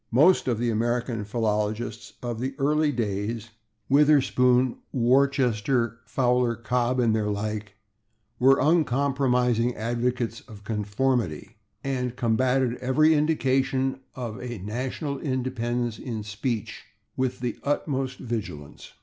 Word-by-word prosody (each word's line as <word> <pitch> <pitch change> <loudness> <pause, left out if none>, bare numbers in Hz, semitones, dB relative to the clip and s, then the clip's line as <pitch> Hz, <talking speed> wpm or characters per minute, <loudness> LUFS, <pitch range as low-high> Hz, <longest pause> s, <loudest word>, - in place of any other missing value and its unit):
Most 150 +11 +4
of 120 -3 +1
the 120 +1 0
American 115 0 -1
philologists 110 0 -2
of 120 -2 -3
the 130 +2 -3
early 150 +2 +2
days 110 -1 -3 0.4
Witherspoon, 130 -3 +4
Worcester, 125 -2 +2
Fowler, 125 0 +1
Cobb 120 +2 0
and 115 -3 +3
their 105 -1 0
like 105 0 -3 0.6
were 135 +2 +6
uncompromising 130 -6 +2
advocates 120 +1 -2
of 105 -4 -12
conformity, 105 - -1 0.3
and 125 -3 -2
combatted 125 +1 +1
every 150 +5 +4
indication 135 -3 +1 0.2
of 120 -4 -5
a 120 -2 -5
national 130 - -4
independence 120 -3 -2
in 115 -4 -5
speech 105 +2 -4 0.3
with 130 -1 -1
the 120 -2 -3
utmost 135 -3 -1
vigilance. 105 - -6
125 Hz, 110 wpm, -26 LUFS, 110-130 Hz, 0.6 s, were